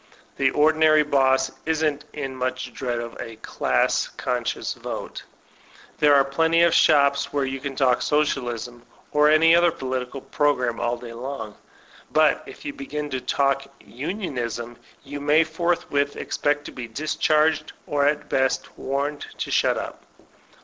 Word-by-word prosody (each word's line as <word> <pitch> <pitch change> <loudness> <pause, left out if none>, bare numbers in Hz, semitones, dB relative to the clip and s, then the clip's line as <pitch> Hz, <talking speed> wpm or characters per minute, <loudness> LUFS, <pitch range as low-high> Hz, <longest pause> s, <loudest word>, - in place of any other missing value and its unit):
The 135 - +3
ordinary 155 +1 +4
boss 135 -2 +2 0.2
isn't 155 -2 0
in 135 -3 -5
much 130 0 -3
dread 125 -3 -3
of 115 0 -6
a 115 - -7
"class 65 - 0
conscious - - -3
vote"; - - -6 0.8
there 145 -1 +6
are 140 - +6
plenty 165 +4 +2
of 170 -1 +4
shops 140 -3 +4
where 140 -2 0
you 135 0 -4
can 135 0 -5
talk 125 -3 +2
Socialism 120 -5 -1 0.3
or 150 0 +4
any 165 +2 +6
other 170 0 +4
po 145 - -9
litical 130 +1 -3
program 125 -6 +1
all 120 +1 -1
day 120 -1 -9
long; 115 -3 -6 0.6
but 155 -2 +3
if - - -12
you 290 - -4
begin 150 - -5
to 130 -1 -2
talk 140 0 0
Unionism, 120 - -5 0.3
you 145 +1 -7
may 150 +3 +4
forthwith 160 -3 -1
expect 145 0 -1
to - - -7
be 125 -2 -7
discharged, 155 +4 +1
or 145 -1 +1
at 150 0 0
best 130 0 0
warned 140 +2 -2
to - - -4
shut - - +2
up. - - -6
140 Hz, 150 wpm, -24 LUFS, 130-155 Hz, 0.8 s, there